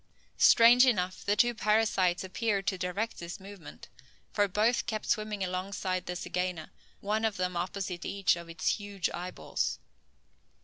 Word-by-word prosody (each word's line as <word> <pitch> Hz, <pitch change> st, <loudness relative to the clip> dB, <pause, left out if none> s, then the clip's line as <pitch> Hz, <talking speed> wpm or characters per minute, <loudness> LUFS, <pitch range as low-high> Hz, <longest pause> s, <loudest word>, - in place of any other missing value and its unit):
Strange 240 Hz, +1 st, +7 dB
enough, 185 Hz, -6 st, 0 dB
the 205 Hz, -, +1 dB
two 240 Hz, +3 st, +3 dB
parasites 210 Hz, -5 st, +1 dB
appeared 200 Hz, +1 st, -1 dB
to 190 Hz, -, 0 dB
direct 185 Hz, +5 st, -3 dB
this 170 Hz, 0 st, -7 dB
movement: 195 Hz, -2 st, -11 dB, 0.4 s
for 205 Hz, -1 st, +2 dB
both 215 Hz, +5 st, +1 dB
kept 215 Hz, -2 st, -3 dB
swimming 215 Hz, -3 st, -1 dB
alongside 185 Hz, 0 st, -3 dB
the 180 Hz, -, -3 dB
zygaena, 180 Hz, -1 st, -3 dB, 0.3 s
one 215 Hz, +2 st, -1 dB
of 220 Hz, -2 st, 0 dB
them 180 Hz, -1 st, -2 dB
opposite 180 Hz, 0 st, -3 dB
each 195 Hz, -3 st, +1 dB
of 170 Hz, -1 st, -9 dB
its 165 Hz, -1 st, 0 dB
huge 200 Hz, -3 st, -3 dB
eyeballs. 180 Hz, +1 st, -3 dB
195 Hz, 145 wpm, -30 LUFS, 180-215 Hz, 0.4 s, Strange